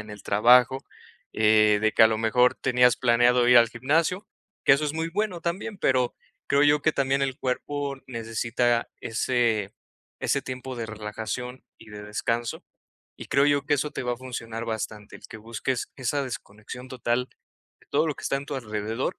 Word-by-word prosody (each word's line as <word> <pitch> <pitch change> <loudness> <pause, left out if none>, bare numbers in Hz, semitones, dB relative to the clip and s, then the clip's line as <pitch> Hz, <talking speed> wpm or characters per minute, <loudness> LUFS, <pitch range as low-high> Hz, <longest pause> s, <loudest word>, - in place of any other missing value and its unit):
en 105 - -10
el 105 -1 -10
trabajo, 125 +5 +4 0.5
eh, 105 -1 +4
de 110 - +2
que 115 - +5
a - - +9
lo 110 - 0
mejor 125 +3 +3
tenías 125 -2 +3
planeado 120 0 +3
ir 125 -1 +8
al 115 -1 +5
gimnasio, 160 - 0 0.4
que - - +6
eso 145 +2 +2
es 145 - -3
muy 160 +1 -2
bueno 195 -2 -2
también, 195 +5 -3
pero 130 -4 +1 0.3
creo 140 +1 +3
yo 145 0 +4
que 155 - +2
también 135 0 0
el 130 -1 -2
cuerpo 140 +2 -3
necesita 115 0 -1
ese 115 -3 0 0.5
ese - - +1
tiempo 130 0 -6
de 115 -1 -4
relajación 110 +4 -6 0.2
y 110 -1 -15
de 105 0 -9
descanso, 115 +3 -3 0.5
y - - -8
creo 140 +1 +3
yo 145 -1 +2
que 145 - +3
eso 145 +1 -2
te - - -4
va 125 0 -1
a - - -14
funcionar 115 -3 -6
bastante, 110 -2 -5
el - - -14
que 110 - -9
busques 115 +3 -4
esa 135 +2 -1
desconexión 125 +1 -8
total 125 0 -1 0.5
de - - -25
todo 155 +3 +2
lo 150 - -1
que - - -12
está 135 - 0
en 140 +1 -7
tu 145 - -5
alrededor 110 0 -3
125 Hz, 190 wpm, -25 LUFS, 110-135 Hz, 0.5 s, a